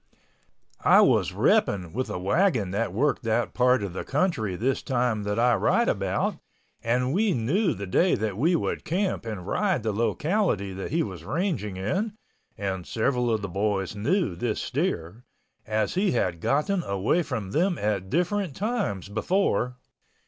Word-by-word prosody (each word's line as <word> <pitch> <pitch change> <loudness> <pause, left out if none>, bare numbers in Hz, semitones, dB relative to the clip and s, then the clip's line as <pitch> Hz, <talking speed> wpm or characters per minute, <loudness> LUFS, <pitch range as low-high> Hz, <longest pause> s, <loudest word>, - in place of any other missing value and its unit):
I - - +7
was - - +3
repping 90 -5 +1
with 130 +4 -2
a - - -3
wagon 105 - +1
that 100 0 -1
worked 135 +8 +1
that 115 0 0
part 125 -2 +3
of 95 -4 -4
the - - -4
country 135 - 0
this 130 +8 0
time 120 -4 0
that 105 +1 -1
I 120 +1 +4
write - - +2
about - - 0 0.5
and 125 +3 +1
we 205 +1 +2
knew 165 - +1
the 100 - -5
day 170 - +3
that 105 -2 -2
we 160 - +2
would - - -2
camp 185 - -1
and 100 -6 -5
ride 185 - 0
the 110 - 0
locality 120 - 0
that 95 +1 -5
he 165 +3 +1
was 95 -6 -7
ranging 135 - -2
in 190 - -1 0.4
and 95 -3 -3
several 125 +2 0
of 110 -2 0
the - - -2
boys 100 +1 -1
knew 110 - 0
this 110 +5 -2
steer, 120 - -2 0.4
as 110 -1 0
he 190 -1 +1
had 90 -8 0
gotten 175 +7 +1
away 100 - 0
from 125 - -4
them 175 - +1
at 100 -3 -1
different 180 - 0
times 205 - -2
before. 125 - 0
120 Hz, 165 wpm, -26 LUFS, 100-170 Hz, 0.5 s, I